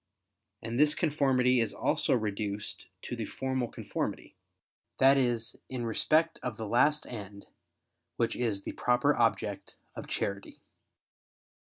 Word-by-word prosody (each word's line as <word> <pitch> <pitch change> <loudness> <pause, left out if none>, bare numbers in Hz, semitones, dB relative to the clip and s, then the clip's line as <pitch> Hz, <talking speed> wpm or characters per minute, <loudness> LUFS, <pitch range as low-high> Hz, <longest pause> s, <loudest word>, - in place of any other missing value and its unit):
And 115 +3 -3
this 150 0 +4
conformity 135 -5 +2
is 115 -2 -1
also 150 -3 +1
reduced 105 -2 -4 0.2
to - - -5
the - - -4
formal 130 -2 -2
conformity, - - -5 0.6
that 135 +1 +7
is 120 -4 +1
in 125 -2 -3
respect 155 +8 +2
of 125 -3 -4
the 110 - -5
last 145 +8 +3
end, 100 -3 -8 0.7
which 115 - 0
is 110 -5 0
the - - -4
proper 125 0 +2
object - - 0 0.2
of - - -8
charity. 100 0 -3
120 Hz, 130 wpm, -30 LUFS, 110-135 Hz, 0.7 s, that